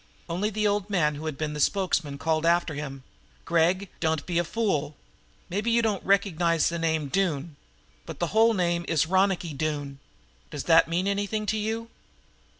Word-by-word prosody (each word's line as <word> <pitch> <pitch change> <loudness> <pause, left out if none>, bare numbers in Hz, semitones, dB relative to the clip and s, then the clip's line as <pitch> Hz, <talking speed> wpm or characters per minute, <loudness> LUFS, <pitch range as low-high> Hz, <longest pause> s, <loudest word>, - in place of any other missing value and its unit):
Only 180 +5 -1
the 215 0 -1
old 205 0 0
man 160 -7 +2
who 150 +2 -6
had 155 -3 -4
been 155 -1 -3
the 150 - -5
spokesman 165 -5 0
called 160 +1 0
after 170 -1 +2
him: 135 -2 -6 0.4
"Gregg, 175 +4 +2
don't 160 -2 0
be 175 -1 0
a - - +2
fool. 165 -7 -1 0.5
Maybe 205 +6 -1
you 235 0 +3
don't 210 -4 0
recognize 175 -4 +2
the 170 0 -3
name 160 -1 0
of 140 - -7
Doone, 165 -5 -1 0.5
but - - -7
the 175 - 0
whole 225 +1 +5
name 175 -2 0
is 160 -3 +2
Ronicky 185 -2 +1
Doone. 145 -1 -3 0.5
Does 145 - -5
that 165 -1 +5
mean 170 +3 -1
anything 205 +2 -1
to 215 +1 0
you?" 225 +2 -3
170 Hz, 180 wpm, -26 LUFS, 155-200 Hz, 0.5 s, whole